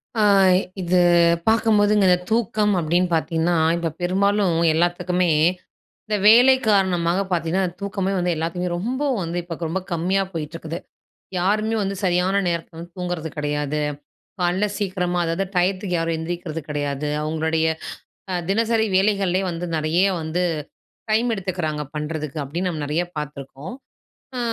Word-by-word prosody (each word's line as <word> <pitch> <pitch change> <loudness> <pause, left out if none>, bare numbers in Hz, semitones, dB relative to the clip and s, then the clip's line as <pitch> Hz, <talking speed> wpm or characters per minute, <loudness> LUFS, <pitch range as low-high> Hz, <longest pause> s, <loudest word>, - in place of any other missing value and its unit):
ஆ. 220 - +1 0.6
இது 180 0 +2 0.5
பார்க்கும்போதுங்க 210 -3 +4 0.2
தூக்கம் 215 -2 +1
அப்பிடின்னு 175 +3 +1
பார்த்தீங்கன்னா, 165 +1 0 0.2
இப்ப 170 -1 -2
பெரும்பாலும் 195 0 +2 0.2
எல்லாத்துக்குமே 175 +1 +1 0.8
இந்த 210 -1 0
வேலை 245 +4 +8
காரணமா 185 -4 +2 0.2
பார்த்தீங்கன்னா, 175 +2 0 0.2
தூக்கமே 195 -1 -2
வந்து 175 0 +1
எல்லாத்துக்குமே, 175 +2 -2
ரொம்ப 245 +9 -3 0.2
வந்து 170 0 -3
இப்ப 170 -1 -6
ரொம்ப 190 +4 -2
கம்மியா 180 +4 +1
போயிட்டுருக்குது. 165 +1 -5 0.6
யாருமே 215 +5 +1
வந்து 195 0 -2
சரியான 185 +2 +2
நேரத்தில 170 0 -3
வந்து 170 +1 -9
தூங்குறது 175 -3 -3
கிடையாது. 150 0 -1 0.6
கால்ல 180 +3 +1
சீக்கிரமா 180 -3 -1
அதாவது 165 +4 -1
டயத்துக்கு 185 +1 0
யாரும் 165 0 -1
எந்திரிக்கிறது 165 -1 -4
கிடையாது. 145 0 -2
அவுங்களுடைய 160 +1 0 0.6
அ - - -1
தினசரி 225 +2 +2
வேலைகள்லயே 195 -1 +2
வந்து 170 +1 -4
நிறைய 160 +5 +2 0.2
வந்து 160 +3 -1 0.7
டைம் 225 +3 +2
எடுத்துக்கிறாங்க 180 -6 -3
பண்ணுறதுக்கு 150 0 -4
அப்பிடின்னு 170 +7 -3
நம்ம 155 -3 -4
நிறைய 155 +4 0
பார்த்துருக்கோம். 145 - -7 0.6
ஆ - - -1
175 Hz, 125 wpm, -22 LUFS, 160-195 Hz, 0.8 s, வேலை